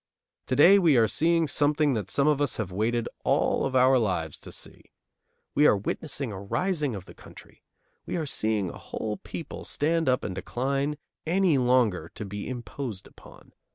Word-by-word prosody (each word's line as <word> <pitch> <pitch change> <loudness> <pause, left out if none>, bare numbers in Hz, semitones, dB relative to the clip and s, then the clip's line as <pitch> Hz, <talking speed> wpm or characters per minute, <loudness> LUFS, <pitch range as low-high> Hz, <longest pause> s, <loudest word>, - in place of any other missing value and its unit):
To 130 - 0
day 185 +9 +7
we 165 -8 +4
are 115 -1 +5
seeing 165 - +2
something 145 0 +2
that 105 -5 -3
some 140 +1 +2
of 150 -1 +2
us 145 - 0
have 105 -4 -3
waited 115 +5 0 0.2
all - - +2
of 135 - -5
our 130 0 +5
lives 90 -8 -2
to - - -10
see. - - -8 0.7
We 150 +1 +5
are - - +4
witnessing 135 +4 -3
a 95 -1 -7
rising 150 - -1
of 95 -2 -8
the - - -13
country. - - -15 0.5
We - - -3
are 165 -3 -1
seeing 110 - -1
a - - -11
whole 105 -1 -5
people 165 - -7
stand 160 0 0
up 125 - +1
and - - -3
decline 135 +9 -2 0.3
any 175 -4 +3
longer 120 -10 +2
to 105 - -6
be 100 +3 -6
imposed 120 -4 -6
upon. - - -17
130 Hz, 185 wpm, -27 LUFS, 105-150 Hz, 0.7 s, day